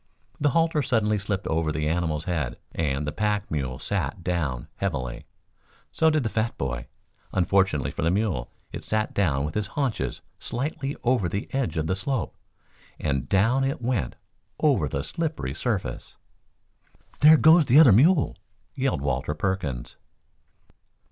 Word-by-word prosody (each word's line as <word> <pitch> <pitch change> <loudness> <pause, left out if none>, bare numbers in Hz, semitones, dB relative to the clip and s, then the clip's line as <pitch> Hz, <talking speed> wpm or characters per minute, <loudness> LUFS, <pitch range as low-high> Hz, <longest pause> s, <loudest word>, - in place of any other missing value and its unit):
The 145 - +3
halter 165 +1 +2
suddenly 110 -5 +1
slipped 100 0 -3
over 80 -1 0
the 75 0 -1
animal's 80 -2 -1
head, 80 -8 -2
and 75 -3 -1
the 75 - -2
pack 105 +2 -1
mule 65 -5 -2
sat 85 - -3
down 80 -9 -2
heavily. 65 -11 -3 0.7
So 160 - +3
did 155 -3 +1
the - - 0
fat 110 +2 -1
boy. 60 -2 -3 0.5
Unfortunately 90 -7 +2
for - - -5
the 80 - +2
mule 95 - 0 0.2
it - - -7
sat 110 0 -1
down 75 -8 +1
with 75 - -5
its 105 -1 0
haunches 135 -6 -1 0.2
slightly 135 +2 -3
over 120 -8 +2
the 100 +4 -4
edge 125 - -1
of 80 - 0
the 95 - 0
slope, 115 +3 -2 0.6
and 70 -3 -1
down 115 +8 +3
it 135 +1 -1
went 120 - -1 0.4
over - - +3
the 70 - -3
slippery 155 - -3
surface. - - -3 1.0
"There 155 +2 +8
goes 160 +1 +6
the 125 +2 +5
other 135 -10 +8
mule!" 150 - +4 0.4
yelled 135 - -1
Walter 70 +2 -1
Perkins. 75 -8 -3
95 Hz, 150 wpm, -25 LUFS, 75-125 Hz, 1.0 s, There